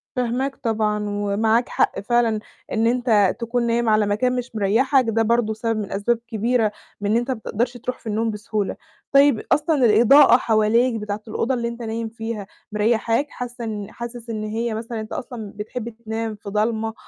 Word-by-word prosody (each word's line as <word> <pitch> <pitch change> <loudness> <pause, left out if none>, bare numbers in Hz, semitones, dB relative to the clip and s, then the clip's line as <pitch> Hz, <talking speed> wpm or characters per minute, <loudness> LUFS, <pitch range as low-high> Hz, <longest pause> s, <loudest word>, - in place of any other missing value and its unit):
فاهماك 250 +3 -1
طبعًا، 215 -4 -1
ومعاك 205 +3 +1
حق - - +1
فعلًا، 230 0 +1 0.3
إن 225 +1 +2
أنت 230 -5 +3
تكون 235 0 -1
نايم 235 -1 +1
على 215 -1 +4
مكان 250 +5 +1
مش 250 -2 -5
مريّحك، 250 +7 +3
ده 225 0 +1
برضه 230 -1 +1
سبب 225 0 -2
من 205 - -5
أسباب 225 +4 0
كبيرة 225 -1 +1 0.3
من 205 +1 0
إن 225 - +4
أنت 240 +2 -1
ما 250 - -2
بتقدرش 240 +3 -2
تروح 250 +2 -5
في - - -12
النوم 220 +1 0
بسهولة، 210 -1 -3 0.4
طيب 275 -5 +5
أصلًا 295 -3 +3
الإضاءة 240 +6 +7
حواليك 230 +2 +2
بتاعة 210 0 -4
الأوضة 230 +4 -1
اللي 235 -1 -1
أنت 235 0 -6
نايم 225 0 -3
فيها 225 -3 -5 0.2
مريّحاك؟ 225 +5 +1
حاسّة 245 -2 -7
إن 210 -3 -5
حاسس 235 0 -8
إن 215 -1 -3
هي 225 +2 -2
مثلًا 225 +1 -4
أنت 215 - -6
أصلًا 225 -5 -6
بتحب 220 +3 -5
تنام 225 -1 -5
في 205 -1 -9
ضلمة، 220 +1 0
225 Hz, 180 wpm, -22 LUFS, 215-240 Hz, 0.4 s, الإضاءة